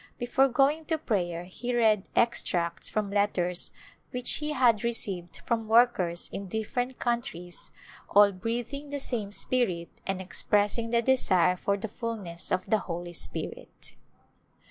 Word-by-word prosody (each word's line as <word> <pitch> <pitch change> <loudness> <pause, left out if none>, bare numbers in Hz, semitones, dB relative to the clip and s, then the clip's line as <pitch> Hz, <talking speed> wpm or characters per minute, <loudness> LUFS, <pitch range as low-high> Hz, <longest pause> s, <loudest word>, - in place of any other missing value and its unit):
Before 245 +3 +3
going 280 +5 +2
to 320 +1 0
prayer 175 - -1
he 240 +7 -4
read 215 -4 +3
extracts 175 -7 +2
from 205 -1 -1
letters 180 -3 0 0.4
which 250 -1 +1
he 300 0 -2
had 240 -7 +3
received 195 -7 -2
from 230 -2 -1
workers 220 -7 +3
in 200 - -5
different 245 +5 -2
countries 180 -8 -3 0.4
all 205 0 +6
breath 230 +6 -3
ing 285 +1 -6
the 285 - -3
same 225 -7 -2
spirit 205 -7 +1 0.2
and 195 -1 -1
expressing 205 +5 +1
the 235 0 +2
desire 185 -9 +4
for 200 +2 0
the 215 +3 -4
fullness 205 -7 -5
of 185 0 +1
the 220 - +3
Holy 175 -1 -5
Spirit. - - -5
215 Hz, 145 wpm, -28 LUFS, 185-240 Hz, 0.4 s, all